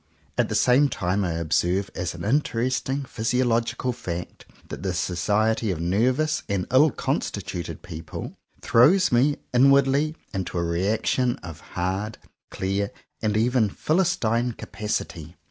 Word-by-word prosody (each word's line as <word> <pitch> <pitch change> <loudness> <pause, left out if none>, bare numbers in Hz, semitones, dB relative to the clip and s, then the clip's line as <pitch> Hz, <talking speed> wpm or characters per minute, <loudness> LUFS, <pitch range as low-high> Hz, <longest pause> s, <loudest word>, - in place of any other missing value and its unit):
At - - +1
the - - -2
same 135 +3 +4
time 95 -1 -1
I 85 -3 -1
observe 85 +4 0
as 90 -1 -3
an 85 - -6
interesting 130 +2 0
physiological 120 +1 0
fact, 90 -7 -6 0.2
that - - -6
the 95 -2 -2
so 90 - -1
ciety 110 +4 +1
of 85 - -3
nervous 125 - +1
and 100 -2 0
ill 140 +5 +6
constituted 85 - -3
people 80 -2 -7 0.3
throws 175 +11 +5
me, 135 +5 +3 0.2
inwardly, 140 +4 +4 0.2
into 95 -2 -3
a 85 - +1
reaction 110 +8 +1
of 85 -3 -8 0.2
hard, 95 +5 -2 0.3
clear, 100 +1 -1 0.3
and 105 -1 +1
even 115 -1 +2
philistine 125 - +1
capacity. 90 -8 -5
110 Hz, 130 wpm, -25 LUFS, 90-130 Hz, 0.3 s, ill